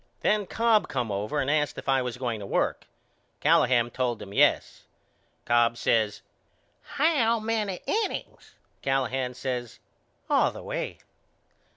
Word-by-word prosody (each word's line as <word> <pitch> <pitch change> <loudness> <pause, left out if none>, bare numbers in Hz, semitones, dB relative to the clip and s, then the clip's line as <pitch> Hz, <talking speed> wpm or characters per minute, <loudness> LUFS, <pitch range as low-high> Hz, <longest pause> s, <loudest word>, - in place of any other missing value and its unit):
Then 210 -2 +1
Cobb 225 0 +2
come 120 -5 -2
over 105 +9 -2
and 135 - -1
asked 150 0 +1
if - - -8
I 135 -1 +3
was 125 -1 -4
going 120 -4 -3
to 100 - -7
work. - - -1 0.5
Callahan 120 -1 +3
told 125 -2 -1
him 100 - -9
Yes. - - +2 0.6
Cobb 120 0 +3
says 110 -3 +1 0.6
How 270 -7 +1
many 215 -4 -2
innings? 430 -1 -3 0.3
Callahan 130 -1 -1
says 125 -2 -4 0.5
All - - +3
the - - -10
way. - - -4
130 Hz, 135 wpm, -27 LUFS, -, 0.6 s, I